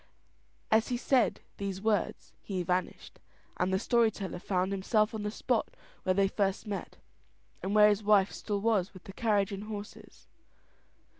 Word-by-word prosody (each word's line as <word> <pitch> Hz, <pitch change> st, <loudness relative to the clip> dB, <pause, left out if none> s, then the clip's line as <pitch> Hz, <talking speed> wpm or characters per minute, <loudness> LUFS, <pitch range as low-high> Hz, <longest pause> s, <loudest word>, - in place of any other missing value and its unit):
As 220 Hz, +1 st, +4 dB
he 245 Hz, -, -1 dB
said 255 Hz, 0 st, +2 dB, 0.2 s
these 195 Hz, -2 st, -3 dB
words 210 Hz, 0 st, -1 dB
he 185 Hz, -3 st, -3 dB
vanished; 180 Hz, +1 st, -3 dB, 0.4 s
and 185 Hz, +1 st, +1 dB
the 190 Hz, -, +3 dB
story 230 Hz, +2 st, +3 dB
teller 195 Hz, -4 st, -6 dB
found 185 Hz, 0 st, -1 dB
himself 210 Hz, +3 st, +1 dB
on 220 Hz, -, -4 dB
the 210 Hz, -, -2 dB
spot 225 Hz, +2 st, -1 dB, 0.3 s
where 185 Hz, -, +1 dB
they 195 Hz, 0 st, +4 dB
first 195 Hz, 0 st, -1 dB
met, 205 Hz, -2 st, -5 dB, 0.6 s
and 195 Hz, +2 st, -2 dB
where 210 Hz, 0 st, +8 dB
his 205 Hz, 0 st, +1 dB
wife 205 Hz, -2 st, +4 dB
still 205 Hz, -2 st, -3 dB
was 205 Hz, -4 st, +1 dB
with 185 Hz, -, -12 dB
the 195 Hz, -, -10 dB
carriage 205 Hz, -3 st, +1 dB
and 200 Hz, +1 st, -5 dB
horses. 210 Hz, -1 st, -9 dB
205 Hz, 165 wpm, -30 LUFS, 195-215 Hz, 0.6 s, where